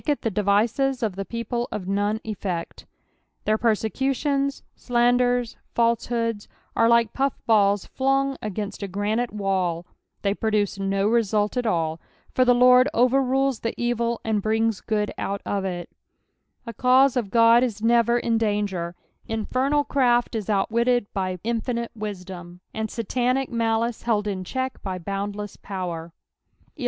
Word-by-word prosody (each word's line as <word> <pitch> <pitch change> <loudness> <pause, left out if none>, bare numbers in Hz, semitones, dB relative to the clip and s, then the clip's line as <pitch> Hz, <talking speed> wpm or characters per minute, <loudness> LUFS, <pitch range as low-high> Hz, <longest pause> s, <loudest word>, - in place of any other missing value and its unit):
lh 295 - +3
the 225 - -1
den'uxt 225 +7 +1
of 210 -5 -1
the 195 - -3
people 235 +3 -3
of 185 -3 -5
none 205 +2 0
effect.'" 190 -5 -5 0.6
Cllicir 215 0 +2
persecutions, 270 - 0
sinnden, 245 0 +1 0.2
fniaehoods, 230 -2 0 0.3
are 230 - +4
tike 235 -2 +3
puff 275 0 -1
balls 205 -3 +3
flung 270 +1 0
against 210 0 -4
a 200 - -3
grauito 210 +5 -1
wall— 185 -4 -1 0.4
they 200 -1 +2
prodw^ 210 -2 0
no 195 +1 0
result 215 -2 +1
at 245 -2 0
all; 165 -4 -1 0.3
for 255 - +4
the 245 -1 +4
Lord 250 +2 +6
overrules 265 +1 +2
the 230 - -4
evil, 235 -1 0
and 220 -2 +1
brings 220 0 0
good 210 -2 -1
out 200 0 -3
ofiy 190 -3 -2 0.8
The 230 - -6
cause 255 +3 +4
of 235 -6 -1
God 230 +2 +6
Is 220 -4 -2
never 235 0 +4
in 230 -1 +1
danger: 205 -5 -1 0.3
infernal 255 +6 0
craft 245 -4 +2
is 220 -4 -3
outwittecf 235 +4 +1
by 185 -2 -2
infinite 235 +1 -2
wisdom, 180 -4 -7
and 220 0 -3
Satanic 250 +4 -1
malice 230 0 0
held 215 -3 0
in 190 -2 -3
check 260 +7 -4
tiy 190 -2 -4
boundless 200 +3 -5
power, 175 -4 -5 0.6
11. - - -22
225 Hz, 145 wpm, -24 LUFS, 200-245 Hz, 0.8 s, Lord